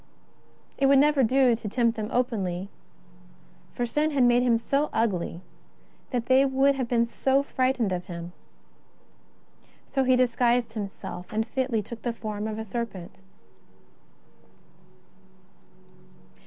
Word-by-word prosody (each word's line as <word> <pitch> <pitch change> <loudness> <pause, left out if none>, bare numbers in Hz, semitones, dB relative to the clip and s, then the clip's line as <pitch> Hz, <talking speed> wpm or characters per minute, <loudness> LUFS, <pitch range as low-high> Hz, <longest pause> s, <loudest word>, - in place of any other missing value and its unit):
It 275 - +4
would 275 0 +6
never 290 0 +4
do 255 0 +4
to 220 -2 -6
tempt 235 +1 +1
them 215 -1 -4
openly, 195 -7 -1 1.1
for 245 - -1
sin 300 +6 0
had 280 -4 +2
made 245 0 +4
him 240 -2 +3
so 280 +6 0
ugly 185 -6 -1 0.7
that 245 -3 -2
they 260 +1 +5
would 270 +1 +3
have 260 -3 -3
been 235 -1 +2
frightened 260 -2 0
of 180 -1 -3
him. 170 0 -8 1.5
So 270 - 0
he 255 0 +4
dis 250 -2 +1
guised 240 -2 +2
himself, 195 -4 -7
and 220 +1 0
fitly 245 -2 -1
took 225 +2 -9
the 240 - -2
form 215 -2 -5
of 215 -1 -4
a 220 - -5
serpent. 205 -5 -6
235 Hz, 130 wpm, -26 LUFS, 215-260 Hz, 1.5 s, would